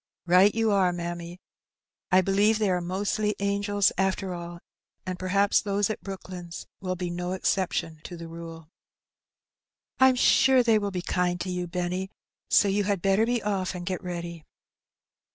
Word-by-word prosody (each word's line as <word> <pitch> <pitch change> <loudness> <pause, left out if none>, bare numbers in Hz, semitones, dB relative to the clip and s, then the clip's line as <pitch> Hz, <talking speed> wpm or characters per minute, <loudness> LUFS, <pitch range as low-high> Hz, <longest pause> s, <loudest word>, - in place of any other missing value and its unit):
"Right 185 +4 +5
you 225 -1 +2
are, 190 -3 +3
mammy; 175 0 -5 0.7
I 185 +1 +6
believe 200 +3 +3
they 210 -3 +1
are 180 -1 0
mostly 205 +4 -1
angels 200 0 +1
after 190 -1 0
all, 170 0 -7 0.5
and 185 -1 -4
perhaps 200 +2 +2
those 205 +1 0
at - - -6
Brooklands 185 -2 -8 0.2
wiU 185 -1 -3
be 175 -1 -3
no 180 +1 -3
exception 180 -4 -1
to 175 - -7
the 165 0 -8
rule." 165 -1 -9 1.3
'^Vm. 260 -1 +5
sure 260 0 +5
they 225 -2 +4
will 205 -1 -2
be 180 -2 -4
kind 180 -1 0
to 185 - -3
you, 180 0 -3
Benny; 180 +2 -3 0.4
so 205 - +5
you 200 +1 +1
had 200 -3 -1
better 195 +3 +3
be 240 -2 0
off 195 -3 -1
and 175 -1 -6
get 185 +1 -3
ready.'' 170 -2 -6
185 Hz, 165 wpm, -26 LUFS, 175-200 Hz, 1.3 s, I